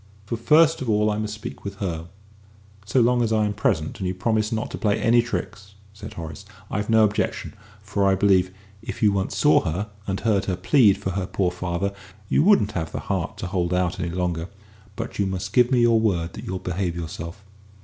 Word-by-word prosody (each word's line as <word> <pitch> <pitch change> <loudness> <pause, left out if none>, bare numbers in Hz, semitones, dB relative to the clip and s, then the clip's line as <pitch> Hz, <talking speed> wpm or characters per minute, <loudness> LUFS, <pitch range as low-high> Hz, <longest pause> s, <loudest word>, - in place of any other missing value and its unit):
For 115 - -3
first 150 +8 +4
of 130 - -3
all 105 0 +3
I 105 - -2
must 105 -1 -3
speak 105 - -8
with 100 0 -5
her." 85 -5 -4 0.8
"So 130 - +3
long 120 +1 +3
as 115 -2 +1
I 110 -1 +3
am 105 - -1
present 80 -6 -1
and 95 - -2
you 90 - -2
promise 110 +3 0
not 110 -1 -2
to - - -5
play 105 -1 +1
any 120 +1 +4
tricks," 105 -4 -5 0.2
said 105 +1 -9
Horace, 80 +2 -7 0.3
"I've 105 0 -2
no 110 -1 +5
objection, 105 0 -1 0.3
for 100 -1 0
I 95 - +4
believe, 95 -2 +3 0.3
if 115 0 -6
you 105 - +6
once 95 -1 -2
saw - - +5
her 95 +7 -3 0.2
and 95 -1 -1
heard 105 -4 +1
her 95 - -1
plead 100 +2 +4
for 95 - -3
her 95 0 -2
poor 95 -2 0
father, 90 +2 -2 0.4
you - - +3
wouldn't 175 - +4
have 80 -6 -3
the - - -4
heart - - -2
to - - -5
hold 90 -1 -1
out 90 0 0
any 85 - -2
longer. 85 -1 -2 0.5
But - - -6
you 100 - +2
must 95 0 -4
give 125 -1 +5
me 125 -2 +4
your 115 -1 +5
word 90 -7 0
that - - -8
you'll 95 - -3
behave 90 -1 -2
yourself." 85 +3 -7
100 Hz, 220 wpm, -24 LUFS, 90-110 Hz, 0.8 s, you